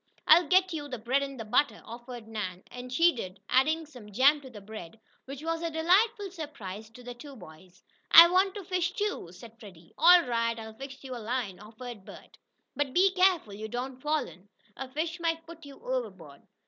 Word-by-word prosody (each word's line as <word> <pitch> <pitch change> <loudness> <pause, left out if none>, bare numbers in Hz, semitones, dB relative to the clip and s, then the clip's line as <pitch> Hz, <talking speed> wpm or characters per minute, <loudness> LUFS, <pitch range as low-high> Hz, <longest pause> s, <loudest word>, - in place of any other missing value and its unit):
"I'll 330 +1 +7
get 370 +2 +3
you 295 -2 -5
the 255 -3 -5
bread 245 +5 0
and 275 -1 -5
butter," 235 -7 +2
offered 235 0 -9
Nan, 190 -5 -5
and 250 0 -9
she 335 +7 +4
did, 190 -5 -7
adding 315 +5 +2
some 245 -8 -13
jam 275 +7 +4
to 265 - -11
the 225 -4 -11
bread, 210 -1 -10 0.3
which 275 +2 -8
was 330 0 -2
a 335 - -2
delightful 385 +6 +2
surprise 220 - -8
to 245 +2 -15
the 245 0 -7
two 275 +3 -12
boys. 180 -2 -15 0.3
"I 335 +1 +11
want 375 +3 +2
to 405 - -6
fish, 360 -1 -1
too," 410 - -3
said 225 +5 -14
Freddie. 180 -7 -15
"All 350 +2 +8
right, 230 -2 -1
I'll 220 -1 -8
fix 270 +4 -10
you 260 -2 -6
a 240 - -7
line," 225 -4 -3
offered 220 +1 -10
Bert. - - -14 0.4
"But 285 -2 -2
be 380 +2 +5
careful 365 - +2
you 215 +2 -6
don't 250 +3 -5
fall 300 -1 0
in. 190 +3 -16 0.3
A 265 - -7
fish 320 +5 -3
might 330 -1 -1
pull 335 0 -11
you 285 -3 -12
overboard." - - -5
265 Hz, 200 wpm, -29 LUFS, 220-330 Hz, 0.4 s, I